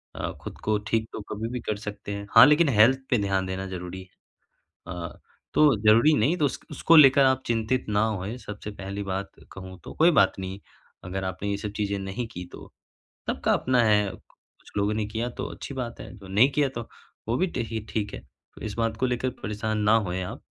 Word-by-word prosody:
अ, - - -3
खुद - - -8
को 110 0 +2
ठीक 110 -1 0
तो - - -5
कभी 110 +2 -3
भी 125 - -4
कर 105 - -2
सकते 105 -1 -7
हैं, 100 0 -6
हाँ 115 +2 +11
लेकिन 150 +1 +4
हेल्थ 125 +3 +5
पे 125 - +3
ध्यान 95 -1 0
देना 95 +1 -4
ज़रूरी 90 0 -6
है। 95 - -14 0.9
अ, 85 -1 -7 0.3
तो 150 -4 +5
ज़रूरी 115 +8 +6
नहीं 150 +12 +2
तो 150 - +2
उस 135 - -2
उसको 165 - +4
लेकर 140 -2 +8
आप 130 0 +2
चिंतित 115 +2 0
ना 105 0 +2
होए। 105 +2 -3
सबसे 105 -2 -8
पहली 100 0 -6
बात 95 0 -3 0.2
कहूँ 95 -1 -9
तो - - -9
कोई 170 +2 +5
बात 140 - +4
नहीं 95 +1 -5 0.5
अगर 95 +1 -4
आपने 95 +2 -3
ये 100 - -1
सब 105 0 -5
चीज़ें 100 -1 -1
नहीं 95 +5 -4
की 90 - -6
तो - - -11 0.6
सबका - - 0
अपना 125 -1 +2
है, 105 -2 +3
कु - - -11 0.4
कुछ - - -18
लोगों 100 +1 +1
ने 105 0 -1
किया 110 +3 -3
तो - - -6
अच्छी 140 - -8
बात 125 -3 -5
है, 105 -3 -9
जो 100 -2 -13
नहीं 105 +8 +4
किया 145 -1 +1
तो 120 - -3 0.5
वो 115 - +2
भी 185 - +2
देखिए 115 - -4
ठीक 105 -2 -3
है - - -5 0.4
तो - - -14
इस 105 - -4
बात 115 -1 0
को 130 - +1
लेकर 125 0 0
परेशान 105 +1 -2
ना 105 +2 +4
होए 90 +1 -2
आप। - - -7
110 Hz, 220 wpm, -26 LUFS, 100-125 Hz, 0.9 s, हाँ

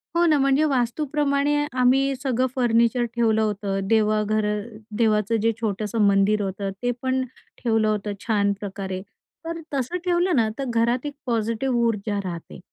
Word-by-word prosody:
हो 345 0 +4
ना, 310 -3 +4
म्हणजे 275 +2 +3
वास्तूप्रमाणे 280 +3 +1 0.3
आम्ही 270 +2 +3
सगळं 260 -1 +1
फर्निचर 240 -1 +2
ठेवलं 220 -2 +2
होतं. 205 -2 -1
देवाघर 215 0 +2 0.5
देवाचं 215 -1 +2
जे 225 +1 +3
छोटंसं 215 0 -1
मंदिर 200 +1 +3
होतं, 195 0 -3
ते 245 0 +1
पण 260 0 0 0.4
ठेवलं 225 -2 +2
होतं 210 -1 -1
छान 205 -3 +2
प्रकारे. 190 -2 -5 0.4
तर 330 0 -4
तसं 275 +6 -1
ठेवलं 355 0 +2
ना, 230 -4 +3
तर 275 - -1
घरात 235 +3 +1
एक 290 - -4
पॉझिटिव्ह 230 +2 0
ऊर्जा 210 -2 -1
राहते. 170 -3 -7
230 Hz, 145 wpm, -24 LUFS, 210-265 Hz, 0.5 s, हो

